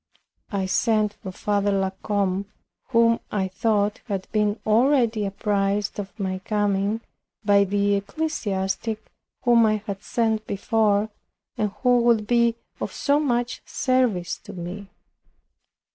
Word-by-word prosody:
I 195 -2 -1
sent 215 +1 +2
for 205 -2 -8
Father 205 +1 0
La 195 -1 +1
Combe, 200 -2 0 0.4
who 230 -2 +4
I 195 -2 0
thought 205 +2 0
had 195 -4 -3
been 210 0 +1
already 230 -2 +3
apprised 200 0 -1
of 205 +2 -7
my 190 -1 -2
coming, 205 +1 0 0.4
by 200 -1 +5
the 200 +1 +1
ecclesiastic 215 -4 -3 0.3
whom 235 -2 +5
I 215 - +3
had 200 -3 -5
sent 220 -2 0
before, 210 0 +1 0.4
and 210 - 0
who 245 -1 +5
would 235 -3 +3
be 235 0 +3 0.2
of - - -3
so 285 0 +1
much 245 -4 -1
service 245 -9 0
to - - -11
me. 185 +3 -7
210 Hz, 130 wpm, -24 LUFS, 200-230 Hz, 0.4 s, by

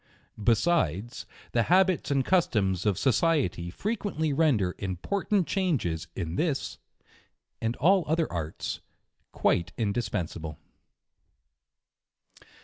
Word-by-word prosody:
Besides, 115 - +1 0.2
the 115 - +2
habits 185 0 +3
and 135 -2 +1
customs 105 - +2
of 100 -4 +2
society 130 - +1
fre 200 - -3
quently 160 -10 -1
render 120 - +2
important 185 - -1
changes 145 - -1
in 85 -1 -3
this, 155 -5 -1 0.8
and 115 +1 -1
all 185 +3 +4
other 160 +2 +2
arts, 80 -2 -4 0.5
quite 85 +2 +1
indispensable. 95 -8 -2
120 Hz, 95 wpm, -28 LUFS, -, 0.8 s, all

